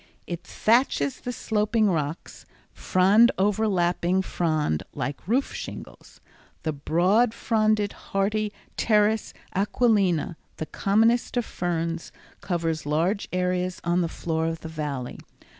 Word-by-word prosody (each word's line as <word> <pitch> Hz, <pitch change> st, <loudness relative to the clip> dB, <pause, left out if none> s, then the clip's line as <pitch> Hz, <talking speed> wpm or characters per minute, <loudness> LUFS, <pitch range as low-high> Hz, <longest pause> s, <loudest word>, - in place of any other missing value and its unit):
It 175 Hz, 0 st, -5 dB
thatches 215 Hz, -, +1 dB
the 245 Hz, -, -4 dB
sloping 215 Hz, -1 st, +1 dB
rocks, 155 Hz, -3 st, -3 dB, 0.3 s
frond 205 Hz, +6 st, +4 dB
overlapping 190 Hz, -3 st, +1 dB
frond 155 Hz, -, 0 dB
like 140 Hz, +4 st, -4 dB
roof 255 Hz, +6 st, +1 dB
shingles. -, -, -9 dB, 0.4 s
The 155 Hz, -, -1 dB
broad 185 Hz, +11 st, +2 dB
fronded, 215 Hz, -3 st, +1 dB, 0.2 s
hardy 210 Hz, +2 st, 0 dB, 0.3 s
Pteris 215 Hz, 0 st, +2 dB, 0.2 s
aquilina, 195 Hz, -5 st, +2 dB, 0.2 s
the 160 Hz, -, -3 dB
commonest 225 Hz, +9 st, +2 dB
of 240 Hz, -, +1 dB
ferns, 165 Hz, -1 st, -3 dB, 0.3 s
covers 165 Hz, -4 st, -2 dB
large 170 Hz, +7 st, 0 dB
areas 180 Hz, 0 st, -1 dB
on 175 Hz, +1 st, +1 dB
the 170 Hz, -, +1 dB
floor 160 Hz, 0 st, -2 dB
of 165 Hz, -1 st, -3 dB
the 160 Hz, -, -7 dB
Valley. 145 Hz, -5 st, -4 dB
185 Hz, 115 wpm, -25 LUFS, 165-215 Hz, 0.4 s, frond